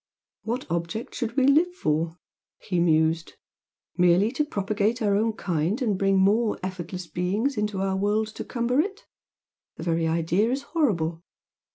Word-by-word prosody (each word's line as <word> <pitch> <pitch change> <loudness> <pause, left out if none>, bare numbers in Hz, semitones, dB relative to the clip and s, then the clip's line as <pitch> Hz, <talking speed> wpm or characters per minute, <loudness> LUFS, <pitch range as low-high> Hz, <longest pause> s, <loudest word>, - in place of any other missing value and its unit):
"What 235 +5 -3
object 170 +7 -3
should 235 +2 -4
we 265 - +4
live 320 +6 +4
for?" 160 - -1 0.4
he 180 -2 -2
mused 160 0 +2 0.6
"Merely 180 +4 +4
to 290 +3 0
propagate 210 -2 -1
our 205 -3 +2
own 220 +2 +1
kind 180 - -1
and 225 -7 +1
bring 195 0 +2
more 210 +4 +3
effortless 185 -1 -5
beings 200 +11 -1
into 210 -2 -1
the 190 0 0
world 210 +3 +1
to 220 - -7
cumber 245 +2 0
it? 395 +6 -1 0.7
The - - -7
very 165 -1 +1
idea 165 +6 +1
is 270 +3 -1
horrible! 175 - 0
200 Hz, 155 wpm, -25 LUFS, 170-235 Hz, 0.7 s, we